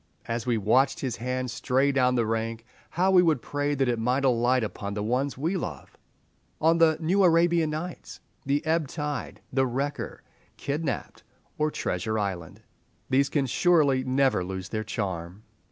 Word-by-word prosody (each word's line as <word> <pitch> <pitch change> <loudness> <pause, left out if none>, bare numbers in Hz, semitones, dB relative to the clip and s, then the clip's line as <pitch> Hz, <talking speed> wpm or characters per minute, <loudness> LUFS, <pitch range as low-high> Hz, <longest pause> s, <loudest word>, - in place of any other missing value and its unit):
As 115 +1 -3
we 120 -2 +2
watched 130 +6 +2
his 130 -3 -2
hand 125 +1 -3
stray 130 +3 +1
down 125 -2 +2
the 120 -2 +2
rank, 115 +1 -2 0.2
how 185 +3 +1
we 185 -1 +7
would 160 -6 +2
pray 145 +3 -2
that 135 -1 +1
it 120 -2 0
might 125 +4 +1
alight 125 0 +3
upon 100 -1 -5
the 105 - -2
ones 130 +5 -1
we 165 +8 -1
love, 75 - -6 0.6
on 165 +1 +3
the 160 -2 +5
"New 180 +5 +2
Arabian 170 -2 +4
Nights" 160 +4 -6 0.2
"The 140 +2 0
Ebb 160 -1 +1
tide," 150 0 -5
"The 135 0 +2
Wrecker," 135 +4 -4 0.3
"Kidnapped," 145 -3 -3 0.4
or 155 0 +2
"Treasure 110 -6 -2
Island." 95 -5 -4 0.5
These 135 +1 +3
can 145 -2 +1
surely 140 -2 +3
never 130 -6 +2
lose 95 0 -5
their 110 0 -2
charm. 95 -3 -4
130 Hz, 165 wpm, -26 LUFS, 115-150 Hz, 0.6 s, we